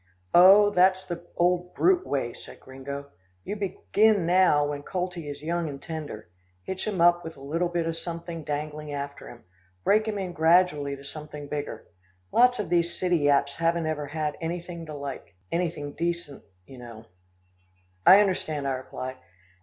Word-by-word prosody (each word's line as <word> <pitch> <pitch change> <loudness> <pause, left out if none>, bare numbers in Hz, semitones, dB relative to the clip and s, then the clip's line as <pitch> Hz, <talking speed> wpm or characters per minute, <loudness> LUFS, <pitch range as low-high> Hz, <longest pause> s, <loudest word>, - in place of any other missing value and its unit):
"Oh, 195 +4 +8
that's 185 0 +3
the 175 -1 -7
old 180 0 +1
brute 365 0 +3
way," 125 -4 -1
said - - -12
Gringo. 140 +2 -8 0.3
"You 205 - -4
begin 205 0 +2
now 175 -4 +4
when 145 0 -4
coltie 175 -2 -4
is 145 0 -8
young 170 0 -1
and 140 -1 -7
tender. 150 - -7 0.4
Hitch 190 - -4
him 200 -4 -2
up 175 0 +5
with 160 -2 -8
a - - -13
little 160 +6 -1
bit 170 -1 -1
of 165 0 -2
something 170 -1 -6
dangling 150 0 -4
after 140 0 -6
him. 120 - -13 0.4
Break 215 +2 +3
him 215 -1 -2
in 185 -3 -4
gradually 160 -4 +3
to 140 - -13
something 150 0 -8
bigger. 145 0 -5 0.5
Lots 250 +1 +5
of 210 - -3
these 170 0 +1
city 180 -1 +2
yaps 140 -1 +2
haven't 165 0 +1
ever 150 -2 -2
had 150 0 -3
anything 170 0 -5
to 150 - -7
like 140 -8 -7 0.2
anything 165 -4 -2
decent, 170 -3 -3 0.2
you 130 +5 -13
know." 115 -2 -11 1.0
"I 195 +3 +9
understand," 155 -7 -1
I - - 0
replied. 130 0 -6
165 Hz, 170 wpm, -26 LUFS, 145-180 Hz, 1.0 s, I